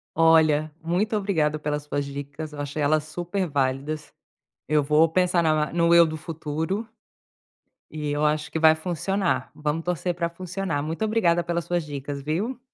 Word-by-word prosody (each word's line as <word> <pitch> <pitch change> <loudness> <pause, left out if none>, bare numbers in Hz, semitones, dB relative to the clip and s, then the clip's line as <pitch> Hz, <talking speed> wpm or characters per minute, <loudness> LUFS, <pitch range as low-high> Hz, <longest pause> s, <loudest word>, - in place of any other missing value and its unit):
Olha, 155 -2 +4
muito 180 +6 0
obrigada 160 -7 +1
pelas 150 -1 -3
suas 145 -1 -2
dicas, 145 +2 -7
eu 145 - -5
achei 145 +1 -5
elas 150 +1 +2
super 175 +4 -3
válidas. 140 +2 -2 0.5
Eu 150 -1 +3
vou 150 +3 +4
pensar 180 +1 +2
na 155 -2 +1
no 170 0 +4
eu 170 - +8
do 160 0 -4
futuro, 160 +6 -3 1.0
e 150 -1 -5
eu 145 +1 0
acho 150 0 -1
que - - -2
vai 160 0 +6
funcionar, 180 +3 -1
vamos 150 +2 -2
torcer 180 0 -1
pra 170 -1 0
funcionar, 180 -3 -3
muito 160 +7 -2
obrigada 175 -6 +2
pelas 170 0 -2
suas 175 -1 -1
dicas 140 -1 -5
viu? 200 - -2
160 Hz, 165 wpm, -25 LUFS, 150-175 Hz, 1.0 s, eu